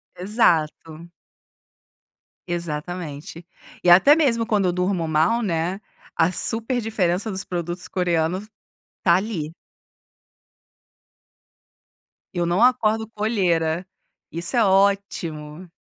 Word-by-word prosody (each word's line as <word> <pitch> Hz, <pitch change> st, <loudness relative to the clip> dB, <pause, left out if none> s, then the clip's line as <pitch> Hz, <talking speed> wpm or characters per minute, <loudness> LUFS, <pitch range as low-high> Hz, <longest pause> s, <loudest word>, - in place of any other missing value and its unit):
Exato. 170 Hz, -5 st, 0 dB, 1.4 s
Exatamente. 170 Hz, -1 st, -5 dB, 0.4 s
E 180 Hz, -, +3 dB
até 190 Hz, +12 st, +7 dB
mesmo 245 Hz, -8 st, +1 dB
quando 210 Hz, -3 st, +1 dB
eu 180 Hz, -, +1 dB
durmo 180 Hz, -2 st, -1 dB
mal, 160 Hz, +9 st, +2 dB
né, 180 Hz, -2 st, -1 dB, 0.4 s
a 165 Hz, +1 st, +3 dB
super 225 Hz, +7 st, -2 dB
diferença 210 Hz, -2 st, -1 dB
dos 190 Hz, 0 st, -4 dB
produtos 175 Hz, 0 st, -5 dB
coreanos 180 Hz, +2 st, -1 dB, 0.6 s
tá 170 Hz, -2 st, +5 dB
ali. 185 Hz, -6 st, -2 dB, 2.8 s
Eu 175 Hz, -1 st, 0 dB
não 175 Hz, +6 st, +2 dB
acordo 220 Hz, -3 st, +2 dB
com 215 Hz, -1 st, -13 dB
olheira, 175 Hz, -6 st, +1 dB, 0.5 s
isso 170 Hz, +8 st, -2 dB
é 230 Hz, -, +4 dB
ótimo. 185 Hz, -5 st, 0 dB
180 Hz, 100 wpm, -22 LUFS, 165-210 Hz, 2.8 s, até